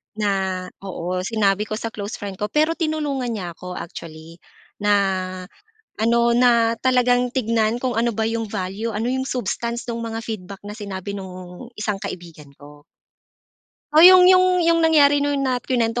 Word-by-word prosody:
na, 195 -3 -1 0.2
oo, 185 -2 -4
sinabi 210 -2 +1
ko 215 - -3
sa 225 +1 -5
close 205 0 -6
friend 200 -2 -7
ko. 210 - -1
Pero 310 +5 +2
tinulungan 305 -6 -2
niya 180 -4 -5
ako, 180 +2 -9
actually, 165 0 -9 0.4
na 205 0 +2 1.0
ano, 235 +1 +2
na 235 -2 +4
talagang 250 -1 +2
tignan 230 -2 0
kung 250 -2 -2
ano 235 +1 +1
ba 220 +1 -1
yung 225 -2 -3
value, 200 +3 -3
ano 220 +2 -2
yung 260 +1 -1
substance 235 -1 -3
no'ng 230 0 -4
mga 225 - -4
feedback 200 -4 -7
na 210 - -7
sinabi 200 -2 -6
no'ng 185 +4 -9
isang 210 -1 -1
kaibigan 170 -6 -9
ko. 145 0 -15 1.1
Oh, 305 - +6
yung 365 +1 +9
yung 365 -1 +5
yung 335 0 +3
nangyari 290 -3 +5
no'n 285 0 0
na 255 -2 0
kinuwento 235 -2 0
225 Hz, 160 wpm, -21 LUFS, 195-250 Hz, 1.1 s, yung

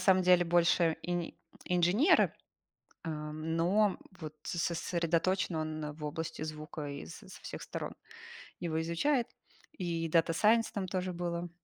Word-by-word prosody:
самом 185 0 +5
деле, 180 -1 +6
больше 170 -1 +3
ини 175 -1 -2 0.3
инженеры, 180 - +4 0.7
ам, 155 0 -3
но 195 +4 +3 0.2
вот 155 -2 -6
с - - -3
сосредоточен 170 +1 +1
он 155 -1 -3
в 150 +1 -9
области 155 +1 -4
звука 155 -1 -5
и 140 - -6
с 80 - -9
со - - -11
всех - - -6
сторон - - -5 0.7
его 160 -2 -1
изучает. 230 - +1 0.5
И 170 -3 -1
Data 165 0 +3
Science 220 +6 +4
там 195 -2 -2
тоже 185 0 -2
было. 175 0 -3
170 Hz, 140 wpm, -32 LUFS, 160-180 Hz, 0.7 s, деле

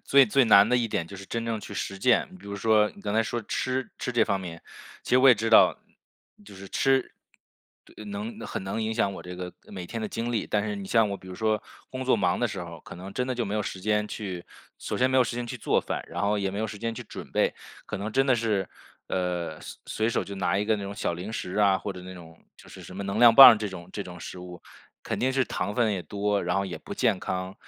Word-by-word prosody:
最 140 -1 +6
最 135 +4 +4
难 105 -2 +7
的 125 - +3
一 120 -2 +1
点 85 -6 -2
就 100 - -10
是 95 - -9
真 115 +3 -3
正 115 -1 -1
去 - - -9
实 100 0 -4
践， 130 - +2
比 - - -15
如 100 - -5
说 105 0 +3
你 - - -14
刚 100 0 -3
才 115 - +4
说 120 +1 -3
吃 130 +4 -2
吃 125 - -3
这 120 -2 +3
方 100 - 0
面， 85 -3 -8 0.4
其 - - -8
实 125 - +6
我 135 +1 +7
也 125 - +9
知 115 +1 -2
道， - - +6 0.7
就 100 - -13
是 95 0 -10
吃 135 +3 +1 0.7
对， - - -12
能 210 +2 -6
很 - - -4
能 95 +4 -2
影 110 0 -1
响 105 -3 +1
我 - - -8
这 90 0 -8
个 90 -1 -6
每 90 -3 -7
天 115 - -5
的 110 - -2
经 115 +3 -3
历， 110 - -1
但 105 -1 0
是 105 -1 -3
你 100 -1 -6
像 115 0 +3
我 100 - -3
比 95 - -16
如 90 - -7
说 110 +1 0 0.3
工 130 0 -5
作 130 - +4
忙 100 -4 +1
的 - - +3
时 - - -5
候， - - -9
可 - - -11
能 95 +2 -9
真 125 - -1
的 130 - -2
就 120 -1 -1
没 100 - -3
有 105 - 0
时 95 - -5
间 105 +1 +1
去 95 -5 -6 0.3
首 - - -4
先 130 +1 +3
没 130 - +2
有 130 - +6
时 115 - -4
间 120 - -3
去 - - -5
做 - - +1
饭， - - -4
然 - - -4
后 105 +1 +1
也 100 -1 -1
没 100 - -5
有 110 - 0
时 105 -1 -8
间 115 +1 -3
去 - - -6
准 - - -9
备， - - +2 0.3
可 - - -4
能 105 +2 -4
真 135 +1 +3
的 130 - +4
是， 105 -6 0 0.4
呃， 90 -3 -2
随 - - -9
随 110 +1 -1
手 - - 0
就 100 - -7
拿 95 - +1
一 105 - 0
个 110 0 +2
那 100 - -6
种 100 0 -5
小 100 - -2
零 90 +6 -6
食 90 -4 -4
啊， 100 -2 +4
或 105 - -5
者 90 - -9
那 95 0 -9
种 80 -2 -13 0.2
就 - - -16
是 - - -11
什 90 - -11
么 100 - -4
能 100 0 -2
量 120 -2 +8
棒 120 -3 +11
这 105 -1 -3
种 90 -3 -9
这 100 - -4
种 90 -2 -10
食 90 - -8
物， 90 -1 -10 0.4
肯 - - -3
定 130 - +2
是 135 0 +2
糖 100 -2 -3
分 115 -3 +2
也 95 - -2
多， 100 +1 -1
然 90 +1 0
后 100 - +1
也 95 -3 -6
不 - - -8
健 - - +1
康。 95 +1 -3
105 Hz, 305 characters per minute, -27 LUFS, 95-115 Hz, 0.7 s, 棒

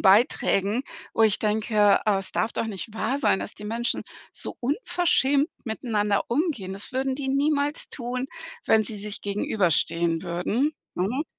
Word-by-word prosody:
Beiträgen, 205 +1 +3 0.3
wo 225 - +2
ich 215 -2 +4
denke, 210 -1 +3
äh: 205 -2 +4
„Es 195 - -2
darf 225 - 0
doch - - -1
nicht 215 +1 -6
wahr 230 +5 -1
sein, 225 -8 +2
dass - - -5
die 210 - -11
Menschen 230 +3 -1 0.3
so - - -2
unverschämt 290 - +2 0.2
miteinander 215 -3 0
umgehen. 245 - -1
Das 195 +2 -4
würden 265 0 0
die 270 0 -4
niemals 285 +2 +1
tun, 250 0 -3 0.4
wenn 220 - +4
sie 215 +1 -4
sich 205 +1 -3
gegenüberstehen 170 -4 +1
würden.“ 190 - 0 0.2
Mhm. 235 - -1
220 Hz, 155 wpm, -25 LUFS, 200-265 Hz, 0.4 s, ich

